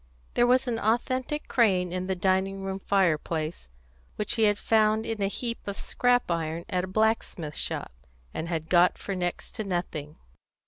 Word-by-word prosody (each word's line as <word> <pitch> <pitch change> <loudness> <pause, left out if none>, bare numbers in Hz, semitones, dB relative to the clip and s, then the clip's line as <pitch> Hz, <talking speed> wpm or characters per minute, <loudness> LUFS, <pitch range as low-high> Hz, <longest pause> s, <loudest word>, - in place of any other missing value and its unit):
There 240 - +4
was 255 +1 +3
an 230 -2 -1
authentic 255 +6 0
crane 185 -7 +2
in 185 0 -2
the 190 - 0
dining 190 +1 0
room 195 0 -3
fireplace, 165 - 0 0.5
which 210 - 0
he 225 -2 +3
had 205 -1 +3
found 220 0 +2
in 225 -2 -3
a 195 - +2
heap 235 +3 -3
of 200 0 -4
scrap 245 -5 +1
iron 165 0 -2
at 180 -2 0
a - - -11
blacksmith's 190 -6 0
shop, - - -2 0.4
and 160 - -3
had 160 -2 -2
got 175 +1 +4
for 200 - -4
next 175 -2 -3
to 220 - -2
nothing. 170 -6 -3
195 Hz, 175 wpm, -27 LUFS, 175-220 Hz, 0.5 s, There